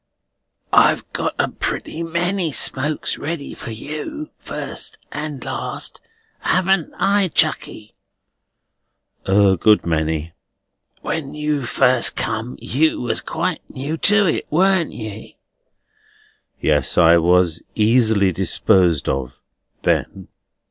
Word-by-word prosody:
"I've - - +3
got - - -2
a - - +1
pretty 160 - -4
many 170 +1 -1
smokes 145 +2 -1
ready 160 -2 -5
for - - -9
you, 155 - -6
first - - -6
and 145 -3 -5
last, - - -4 0.4
haven't 185 -1 +1
I, 200 0 +3
chuckey?" 165 - 0 1.4
"A 95 0 +4
good 105 +4 +4
many." 80 0 -1 0.7
"When 145 -3 -4
you 150 -4 -1
first 125 -1 +3
come, 115 +3 -3
you 155 +5 +1
was 120 - -1
quite - - -3
new 140 +5 -4
to 205 +4 +3
it; 165 - -1
warn't 185 +1 +2
ye?" 110 -2 -8 1.2
"Yes, - - +1
I 85 0 +6
was 85 0 +2
easily 110 -3 +3
disposed 85 -1 +2
of, 65 -1 -2 0.5
then." 95 -2 -1
130 Hz, 105 wpm, -20 LUFS, -, 1.4 s, I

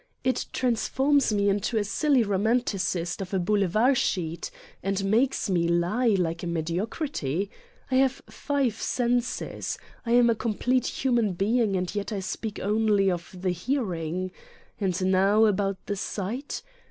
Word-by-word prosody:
It 260 0 0
transforms 265 +2 +2
me 205 -1 +2
in 200 +1 +3
to 225 +3 -1
a 210 - +2
silly 270 +4 +2
romanticist 200 -4 0
of 195 +1 -4
a - - +2
boulevard 210 +7 +2
sheet 170 -8 -2 0.3
and 195 +1 -1
makes 235 +6 +2
me 175 -3 +1
lie 195 +7 +2
like 170 -2 -1
a 175 - -4
mediocrity. 170 - -2 0.4
I 260 - +3
have 265 0 +3
five 280 -5 -1
senses. 245 0 -1 0.3
I 235 - 0
am 240 0 +6
a 230 - +4
complete 235 +3 0
human 240 -6 +1
being 210 +3 +1
and 180 -1 -2
yet 205 +1 -3
I 205 - -2
speak 205 +3 -4
only 205 -1 +2
of 175 +1 -5
the 185 0 0
hearing. 185 - -2 0.5
And 190 -4 0
how 195 +3 +4
about 200 -2 +1
the 205 - -2
sight? 215 - -4
205 Hz, 150 wpm, -26 LUFS, 185-240 Hz, 0.5 s, am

